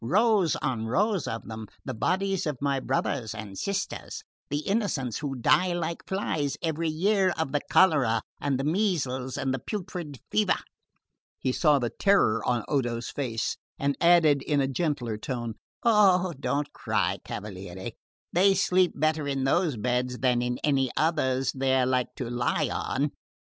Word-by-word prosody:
Rows 200 - +3
and 120 -5 -1
rows 195 - +1
of 115 - -5
them; 110 -1 -7 0.2
the 130 - -3
bodies 190 - 0
of 150 -3 -2
my 140 -1 0
brothers 130 -3 -1
and 105 -2 -7
sisters, 200 - -3 0.3
the 145 +1 -1
Innocents 175 - -1
who 140 -3 -3
die 180 +8 +3
like 170 -1 -3
flies 155 -8 -1
every 165 0 0
year 190 +4 +2
of 160 -5 -1
the 145 0 0
cholera 135 -12 +4 0.2
and 140 -2 0
the - - -1
measles 145 -8 0
and 135 -1 -1
the 135 - -2
putrid 165 - -5
fever." 105 0 +3 0.8
He 130 - -1
saw 150 +2 +4
the 120 -3 -1
terror 195 - +3
in 120 -3 +1
Odo's 120 -4 -1
face 115 -6 -2 0.2
and 140 0 0
added 165 -5 +5
in 145 0 0
a 135 - +2
gentler 135 -5 -1
tone: 120 -1 -4 0.3
"Eh, 190 -5 +5
don't 140 +2 -1
cry, - - 0
cavaliere; 95 -2 -6 0.4
they 195 +3 +5
sleep 185 -1 +3
better 155 0 0
in 135 -1 -1
those 150 0 +1
beds 125 +3 -1
than 125 -2 +2
in 125 0 -1
any 135 -3 +2
others 135 -5 +1
they're 130 -1 +2
like 125 -1 0
to 125 - -4
lie 120 0 0
on. 140 +2 -1
140 Hz, 160 wpm, -27 LUFS, 125-170 Hz, 0.8 s, added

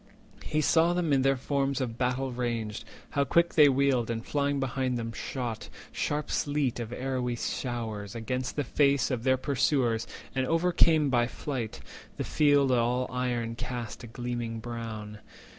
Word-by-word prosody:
He 155 - 0
saw 165 +3 +4
them 175 -4 +1
in 135 - +4
their 135 0 +3
forms 135 0 0
of 120 -3 -3
battle 130 +1 0
ranged, 115 -4 -3 0.3
How 140 - +2
quick 170 +4 +2
they 150 -2 +7
wheeled, 135 -3 +2
and 115 0 -3
flying 140 -1 0
behind 130 -1 -1
them 115 -1 -3
shot 120 -4 -4 0.2
Sharp 150 0 -2
sleet 145 -4 0
of 115 -1 -5
arrowy 125 -1 -2
showers 115 -5 -4
against 125 +3 -3
the 145 - 0
face 140 +1 +2
Of 125 -3 -1
their 130 0 +3
pursuers, 130 -4 +1 0.3
and 130 -1 0
overcame 165 -3 +3
by 120 -2 +3
flight; 125 -4 -4 0.4
The - - -1
field 145 -3 +3
all 125 +1 +2
iron 120 -2 -1
cast 120 -1 -5
a - - -7
gleaming 120 -1 -4
brown. 110 -2 -6
125 Hz, 160 wpm, -29 LUFS, 120-140 Hz, 0.4 s, they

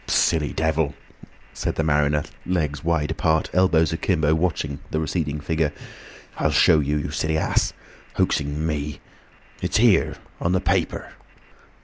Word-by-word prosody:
"Silly 80 -4 +2
devil!" 80 -2 0 0.6
said - - -3
the 80 - 0
mariner, 75 -1 +2 0.2
legs 75 -6 -1
wide 80 -3 0
apart, 80 -1 +1
elbows 85 -3 +3
akimbo, 80 -3 +1
watching 80 -4 -1
the 80 - -1
receding 75 -1 -2
figure. 80 0 0 0.7
"I'll - - +2
show 80 - +5
you, 75 +1 0
you 75 0 -3
silly 80 0 0
ass—hoaxing 75 -1 -1
me! 75 -3 -3 0.6
It's - - 0
here—on 85 - +1
the 95 - +3
paper!" - - -1
80 Hz, 125 wpm, -23 LUFS, 75-80 Hz, 0.7 s, show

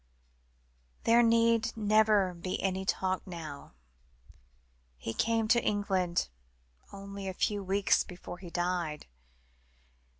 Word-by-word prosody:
"There 230 +1 +5
need 230 0 +3
never 210 -3 +3
be 175 +2 -4
any 190 0 -1
talk 190 0 -1
now. 155 - -8 1.2
He 115 - -5
came 225 - +1
to 235 0 +4
England 190 -4 0 0.6
only 200 0 -7
a 190 - -4
few 205 +1 0
weeks 195 +1 +2
before 175 0 -9
he 180 - -9
died. 175 -3 -2
195 Hz, 105 wpm, -30 LUFS, 180-215 Hz, 1.2 s, There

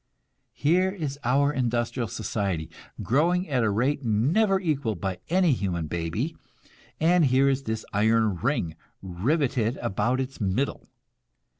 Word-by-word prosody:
Here 175 +8 +2
is 155 -8 -5
our 140 +4 +2
industrial 120 -2 -1
society, 95 -5 -3 0.3
growing 175 +9 +2
at 130 -5 +1
a 110 - +2
rate 130 +8 0
never 155 - +2
equalled 140 - -1
by 95 0 -3
any 180 -1 +3
human 95 - -1
baby; 85 - -3 0.6
and 170 +1 +4
here 135 +1 +3
is 135 0 0
this 110 0 -3
iron 110 -1 +2
ring 100 - -1 0.3
riveted 120 - 0
about 115 +6 0
its 135 -1 -4
middle. 105 +8 -1
125 Hz, 130 wpm, -26 LUFS, 105-145 Hz, 0.6 s, and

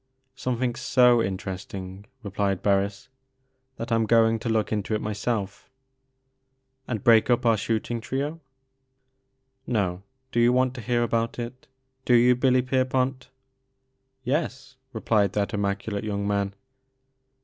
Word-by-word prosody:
"Something 125 -1 -2
so 125 -1 +4
interesting," 95 0 -5 0.2
replied 100 -2 -1
Barris, 100 +2 0 0.3
" 130 0 -47
that 115 +1 -6
I - - +4
'm 115 -1 +1
going 115 0 +4
to 115 - -4
look 110 -1 0
into 110 0 -1
it - - -1
myself 105 -1 -3 0.4
" 130 0 -49
" 130 0 -48
And 110 -5 -3
break 115 -1 +5
up 120 0 +2
our 115 -1 +5
shooting 115 +2 -2
trio 140 +7 -3 0.7
" 130 0 -48
"No. 90 -2 -1 0.3
Do 120 - 0
you 120 +1 +5
want 130 0 +2
to 125 - -7
hear 120 +1 +1
about 115 -1 -1
it? 120 +2 -7 0.4
Do 125 - +4
you 125 +1 +5
Billy 125 0 +3
Pierpont? 130 0 0 0.5
" 130 0 -49
"Yes," 135 -1 -2 0.2
replied 105 -4 +1
that 100 -1 0
immactdate 100 0 -2
young 100 -1 -3
man. 100 -1 -1
120 Hz, 150 wpm, -25 LUFS, 105-130 Hz, 0.7 s, break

